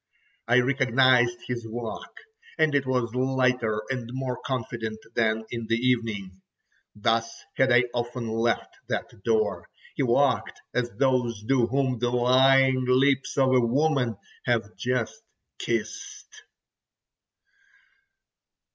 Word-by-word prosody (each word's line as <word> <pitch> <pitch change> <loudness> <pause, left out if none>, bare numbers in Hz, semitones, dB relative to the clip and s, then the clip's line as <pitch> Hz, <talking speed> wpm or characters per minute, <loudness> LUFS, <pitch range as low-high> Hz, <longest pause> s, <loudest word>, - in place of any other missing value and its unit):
I 125 +1 +5
recognized 130 -2 +3
his 120 -2 -4
walk, 115 0 -7 0.4
and 155 -2 +2
it 140 -2 +1
was 125 -3 0
lighter 125 -4 +1
and 125 -3 -4
more 130 -1 -3
confident 115 -4 -4 0.2
than 110 -1 0
in 115 -2 -5
the 115 - +2
evening: 115 -6 -1 0.5
thus 115 +2 -1
had 130 -1 +3
I 120 +1 +6
often 120 0 -3
left 115 +1 -1
that - - -3
door. 110 -2 0 0.3
He - - -1
walked, - - +1
as 125 -1 0
those 125 -5 +1
do, 125 0 +2
whom 130 -1 0
the 120 +1 0
lying 130 +1 +4
lips 135 +1 +2
of 130 -1 +3
a 130 - +5
woman 125 -2 +1 0.3
have 115 -3 0
just 125 - -2 0.4
kissed. 435 -1 -5
125 Hz, 120 wpm, -26 LUFS, 115-130 Hz, 0.5 s, I